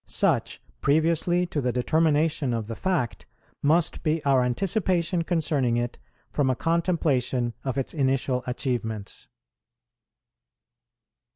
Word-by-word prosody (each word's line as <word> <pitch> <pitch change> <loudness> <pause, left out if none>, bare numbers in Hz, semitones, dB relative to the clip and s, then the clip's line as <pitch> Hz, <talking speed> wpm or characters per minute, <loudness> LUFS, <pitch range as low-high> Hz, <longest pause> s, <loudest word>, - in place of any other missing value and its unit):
Such - - +1 0.2
previously 165 +4 +2
to 155 -4 -2
the 125 -1 0
determination 150 0 +1
of 115 -2 -3
the 115 +1 -6
fact, 175 - -2 0.3
must 155 +3 +2
be 155 -1 -1
our 135 -2 +4
anticipation 175 - 0
concerning 150 -8 +1
it 120 0 -3 0.3
from 140 -3 +1
a 130 - +2
contemplation 140 -8 0
of 130 -2 -3
its 135 - -2
initial 130 -3 0
achievements. 115 -5 -3
140 Hz, 110 wpm, -26 LUFS, 125-165 Hz, 0.3 s, our